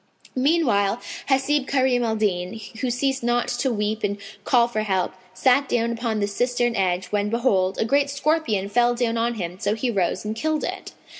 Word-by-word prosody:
Meanwhile 255 Hz, -8 st, +2 dB, 0.3 s
Hasib 270 Hz, +1 st, +2 dB
Karim 260 Hz, -3 st, +2 dB
al 225 Hz, -1 st, 0 dB
Din, 195 Hz, -1 st, -1 dB, 0.2 s
who 255 Hz, -, 0 dB
ceased 265 Hz, +2 st, 0 dB
not 240 Hz, 0 st, +1 dB
to 245 Hz, +2 st, 0 dB
weep 215 Hz, 0 st, -2 dB
and 205 Hz, 0 st, 0 dB, 0.3 s
call 240 Hz, -2 st, +4 dB
for 220 Hz, -3 st, -2 dB
help, 190 Hz, -4 st, 0 dB, 0.2 s
sat 260 Hz, +6 st, +3 dB
down 235 Hz, -1 st, +1 dB
upon 230 Hz, -2 st, -2 dB
the 205 Hz, -, +1 dB
cistern 240 Hz, +3 st, 0 dB
edge 180 Hz, -2 st, 0 dB
when 205 Hz, 0 st, 0 dB
behold, 200 Hz, -5 st, +1 dB
a -, -, +1 dB
great 280 Hz, +4 st, +2 dB
scorpion 280 Hz, -8 st, 0 dB
fell 240 Hz, +3 st, +2 dB
down 235 Hz, -1 st, 0 dB
on 235 Hz, +1 st, 0 dB
him; 180 Hz, -3 st, -5 dB
so 205 Hz, +2 st, 0 dB
he 240 Hz, +2 st, -1 dB
rose 185 Hz, -1 st, -1 dB
and 215 Hz, +1 st, -3 dB
killed 310 Hz, +5 st, -1 dB
it. -, -, -5 dB
235 Hz, 190 wpm, -23 LUFS, 205-255 Hz, 0.3 s, call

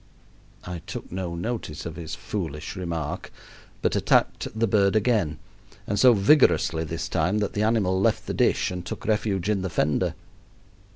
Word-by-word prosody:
I 90 Hz, -1 st, -6 dB
took 90 Hz, -, -7 dB
no 90 Hz, -2 st, -3 dB
notice 90 Hz, -4 st, -4 dB
of 85 Hz, -1 st, -5 dB
his 80 Hz, -2 st, -6 dB
foolish 80 Hz, -7 st, -5 dB
remark, 85 Hz, -5 st, -4 dB, 0.5 s
but -, -, +2 dB
attacked -, -, +2 dB
the 115 Hz, -, +4 dB
bird 100 Hz, -1 st, +3 dB
again; 105 Hz, -9 st, +2 dB, 0.5 s
and 100 Hz, 0 st, -1 dB
so 125 Hz, +2 st, +7 dB
vigorously 100 Hz, -, +4 dB
this 80 Hz, +1 st, -4 dB
time 95 Hz, +4 st, +1 dB
that 105 Hz, -2 st, -1 dB
the 105 Hz, -, -1 dB
animal 105 Hz, -4 st, +2 dB
left -, -, +1 dB
the -, -, -3 dB
dish -, -, +2 dB
and 90 Hz, -1 st, -5 dB
took 85 Hz, -, -7 dB
refuge 105 Hz, -4 st, 0 dB
in 105 Hz, -3 st, +1 dB
the 95 Hz, -, -2 dB
fender. 75 Hz, -2 st, 0 dB
95 Hz, 165 wpm, -25 LUFS, 85-105 Hz, 0.5 s, so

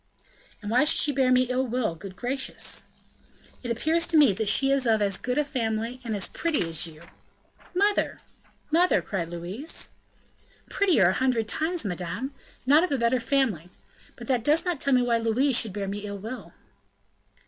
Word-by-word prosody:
"And 205 Hz, -, -4 dB
why 250 Hz, +6 st, +4 dB
should 300 Hz, -, +4 dB
she 290 Hz, -, +3 dB
bear 265 Hz, -2 st, +2 dB
me 255 Hz, 0 st, +5 dB
ill 255 Hz, +1 st, -1 dB
will, 240 Hz, -6 st, -1 dB
good 185 Hz, +3 st, -10 dB
gracious?" 260 Hz, +4 st, -2 dB, 0.7 s
"It 245 Hz, -, -6 dB
appears 315 Hz, +8 st, +1 dB
to 330 Hz, -, +2 dB
me 285 Hz, -9 st, +6 dB
that 205 Hz, +2 st, -1 dB
she 270 Hz, +6 st, +3 dB
is 275 Hz, -2 st, +2 dB
of 220 Hz, -1 st, +3 dB
as 200 Hz, -2 st, +1 dB
good 250 Hz, +6 st, -3 dB
a 300 Hz, -, +3 dB
family, 235 Hz, -3 st, -3 dB
and 225 Hz, -3 st, -3 dB
as 195 Hz, -, -1 dB
pretty 310 Hz, -, -1 dB
as 165 Hz, 0 st, -3 dB
you." 160 Hz, 0 st, -13 dB, 0.7 s
"Mother! 405 Hz, +2 st, +1 dB, 0.5 s
mother!" 350 Hz, +3 st, +3 dB
cried 170 Hz, -5 st, -3 dB
Louise. 180 Hz, -, -5 dB, 0.8 s
"Prettier 330 Hz, -, +3 dB
a -, -, +1 dB
hundred 250 Hz, -3 st, 0 dB
times, 320 Hz, +4 st, -1 dB
madame 200 Hz, +8 st, -4 dB, 0.3 s
not 295 Hz, +5 st, +5 dB
of 365 Hz, -, -1 dB
a 275 Hz, -, +1 dB
better 235 Hz, +1 st, +2 dB
family; 230 Hz, -, 0 dB, 0.5 s
but -, -, -10 dB
that 250 Hz, -4 st, +1 dB
does 300 Hz, +6 st, +3 dB
not 350 Hz, -6 st, -2 dB
tell 275 Hz, -, +2 dB
me 250 Hz, -, +3 dB
why 235 Hz, -1 st, +2 dB
Louise 235 Hz, +4 st, +2 dB
should 220 Hz, -, -1 dB
bear 200 Hz, 0 st, -4 dB
me 200 Hz, +1 st, -4 dB
ill 200 Hz, -1 st, -6 dB
will." 225 Hz, +6 st, -8 dB
245 Hz, 185 wpm, -26 LUFS, 205-280 Hz, 0.8 s, me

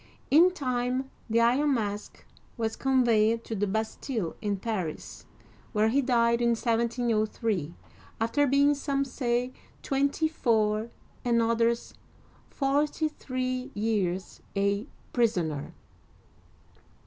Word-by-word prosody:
In 330 Hz, +6 st, +7 dB
time 255 Hz, -4 st, -2 dB, 0.2 s
the 230 Hz, +1 st, +3 dB
Iron 265 Hz, +5 st, +3 dB
Mask 210 Hz, -2 st, -4 dB, 0.3 s
was 225 Hz, -1 st, -1 dB
conveyed 230 Hz, -4 st, +3 dB
to 225 Hz, -, -5 dB
the 205 Hz, 0 st, 0 dB
Bastille 220 Hz, -, -2 dB
in 205 Hz, -2 st, -1 dB
Paris, 190 Hz, -7 st, -5 dB, 0.5 s
where 215 Hz, 0 st, +3 dB
he 275 Hz, +5 st, +3 dB
died 235 Hz, -2 st, +2 dB
in 235 Hz, -1 st, +3 dB
1703, 225 Hz, -, 0 dB, 0.4 s
after 255 Hz, +6 st, +2 dB
being, 280 Hz, +2 st, +4 dB
some 275 Hz, -1 st, -1 dB
say 250 Hz, -1 st, -1 dB, 0.3 s
twenty 280 Hz, +3 st, +1 dB
four, 220 Hz, -6 st, +1 dB, 0.3 s
and 235 Hz, -1 st, +2 dB
others 230 Hz, 0 st, +1 dB, 0.6 s
forty 295 Hz, +3 st, 0 dB
three, 255 Hz, -2 st, -3 dB
years 200 Hz, -4 st, -1 dB
a 200 Hz, +4 st, 0 dB, 0.3 s
prisoner. 175 Hz, -, 0 dB
235 Hz, 105 wpm, -28 LUFS, 215-265 Hz, 0.6 s, In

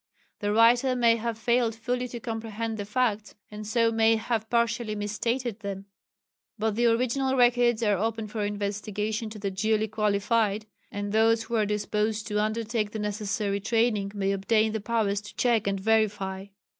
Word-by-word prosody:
The 205 Hz, 0 st, -1 dB
writer 240 Hz, +4 st, +4 dB
may 235 Hz, -2 st, +4 dB
have 230 Hz, 0 st, -3 dB
failed 235 Hz, 0 st, +1 dB
fully 245 Hz, +2 st, -2 dB
to 240 Hz, -1 st, -7 dB
comprehend 225 Hz, -2 st, -4 dB
the 205 Hz, -, -4 dB
facts, 215 Hz, -1 st, -1 dB, 0.2 s
and 210 Hz, 0 st, -7 dB
so 230 Hz, +1 st, +2 dB
may 225 Hz, 0 st, +4 dB
have 220 Hz, 0 st, -2 dB
partially 235 Hz, -2 st, 0 dB
misstated 230 Hz, +3 st, -2 dB
them. 200 Hz, -2 st, -6 dB, 0.7 s
But 220 Hz, -1 st, -1 dB
the 240 Hz, +1 st, +3 dB
original 255 Hz, +3 st, +1 dB
records 240 Hz, -2 st, +3 dB
are 205 Hz, -4 st, +2 dB
open 225 Hz, +1 st, -1 dB
for 210 Hz, 0 st, -3 dB
investigation 210 Hz, +2 st, -3 dB
to 215 Hz, -, -9 dB
the 200 Hz, -1 st, -3 dB
duly 215 Hz, +3 st, +1 dB
qualified, 215 Hz, 0 st, 0 dB, 0.3 s
and 205 Hz, 0 st, -4 dB
those 225 Hz, +1 st, +3 dB
who 235 Hz, +1 st, -4 dB
are 215 Hz, -2 st, +2 dB
disposed 210 Hz, +1 st, -1 dB
to 210 Hz, 0 st, +1 dB
undertake 215 Hz, 0 st, -1 dB
the -, -, -3 dB
necessary 210 Hz, -1 st, -2 dB
training 220 Hz, -2 st, +1 dB
may 195 Hz, -1 st, 0 dB
obtain 215 Hz, +3 st, +2 dB
the 220 Hz, -1 st, -3 dB
powers 210 Hz, -2 st, 0 dB
to 210 Hz, -, -12 dB
check 230 Hz, -4 st, +2 dB
and 195 Hz, -1 st, 0 dB
verify. 200 Hz, -2 st, 0 dB
220 Hz, 170 wpm, -27 LUFS, 210-230 Hz, 0.7 s, writer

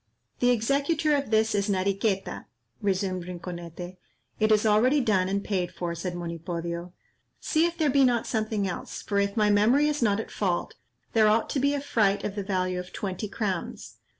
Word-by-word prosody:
"The 245 Hz, -, +3 dB
executor 280 Hz, +7 st, +2 dB
of 280 Hz, -3 st, -2 dB
this 220 Hz, 0 st, +2 dB
is 205 Hz, 0 st, 0 dB
Nariqueta," 195 Hz, +1 st, -1 dB, 0.4 s
resumed 190 Hz, -2 st, -1 dB
Rinconete. 175 Hz, 0 st, -7 dB, 0.4 s
"It 215 Hz, 0 st, +3 dB
is 215 Hz, 0 st, +4 dB
already 230 Hz, +7 st, +4 dB
done 195 Hz, -7 st, +2 dB
and 200 Hz, +1 st, -1 dB
paid 185 Hz, -4 st, -1 dB
for," 175 Hz, -1 st, -4 dB
said 175 Hz, +1 st, -4 dB
Monipodio; 170 Hz, 0 st, -5 dB, 0.5 s
"see 320 Hz, +1 st, +2 dB
if 340 Hz, 0 st, -6 dB
there 310 Hz, -4 st, +2 dB
be 275 Hz, 0 st, +4 dB
not 240 Hz, -3 st, +2 dB
something 215 Hz, -3 st, -1 dB
else, 180 Hz, -, -6 dB
for 200 Hz, -1 st, 0 dB
if 200 Hz, +2 st, 0 dB
my 210 Hz, -1 st, +4 dB
memory 235 Hz, +9 st, +4 dB
is 300 Hz, -2 st, -1 dB
not 210 Hz, -3 st, +2 dB
at 225 Hz, -, -6 dB
fault, 180 Hz, -4 st, -1 dB, 0.4 s
there 220 Hz, -2 st, +5 dB
ought 220 Hz, +1 st, +2 dB
to 275 Hz, -, 0 dB
be 280 Hz, +2 st, +2 dB
a -, -, -1 dB
fright 205 Hz, -7 st, +1 dB
of 205 Hz, -, -2 dB
the 205 Hz, -, -3 dB
value 185 Hz, -2 st, -1 dB
of 180 Hz, 0 st, -8 dB
twenty 195 Hz, +1 st, -4 dB
crowns. 195 Hz, -4 st, -4 dB
205 Hz, 185 wpm, -27 LUFS, 185-230 Hz, 0.5 s, there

